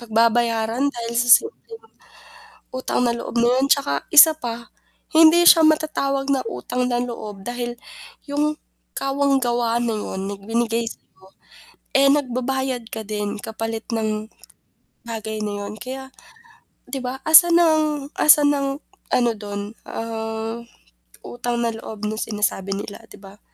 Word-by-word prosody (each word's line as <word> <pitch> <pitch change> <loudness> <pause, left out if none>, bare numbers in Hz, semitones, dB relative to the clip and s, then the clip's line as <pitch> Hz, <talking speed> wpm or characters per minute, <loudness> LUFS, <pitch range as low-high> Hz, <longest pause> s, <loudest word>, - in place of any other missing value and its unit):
pagbabayaran 230 +1 +1
dahil 235 0 -4
sa 245 - -4
simpleng 455 0 -11 0.9
utang 255 - -2
na 235 - +2
loob - - -7
na 240 - +3
'yan. 270 - +2
'Tsaka, 280 0 +2 0.2
isa 320 +1 +10
pa 230 -1 -2 0.6
hindi 330 +2 +7
siya 325 - +8
matatawag 300 -3 +1
na 265 - -1
utang 250 - -3
na 240 - 0
loob, 215 -5 -7
dahil 240 0 -4 0.5
'yong 300 +1 0 0.4
kawang-gawa 265 -4 0
na 230 -2 -1
'yon 190 -2 -5
na 205 - -4
binigay 230 +2 -1
sa'yo, 190 -4 -12 0.8
eh, 275 - +5
nagbabayad 260 -2 -1
ka 220 - -5
din 210 -1 -3
kapalit 225 0 -5
ng 215 -1 -2 0.8
bagay 220 -1 -5
na 210 - -3
'yon. 205 - -7
Kaya, 265 +2 -7 0.8
'di 275 - -3
ba, 255 +1 -5
asan 335 +2 +7
ang 315 -2 +3 0.3
asan 295 -1 +6
ang 275 -1 -1 0.5
ano 240 -1 +3
do'n, 205 0 -6 0.2
ah, 225 0 -5 0.7
utang 240 0 -4
na 230 - 0
loob 220 -1 -8
na 215 - -3
sinasabi 205 -3 -2
nila, 205 +2 -7
'di - - -13
ba? 195 +1 -14
235 Hz, 140 wpm, -21 LUFS, 220-275 Hz, 0.9 s, isa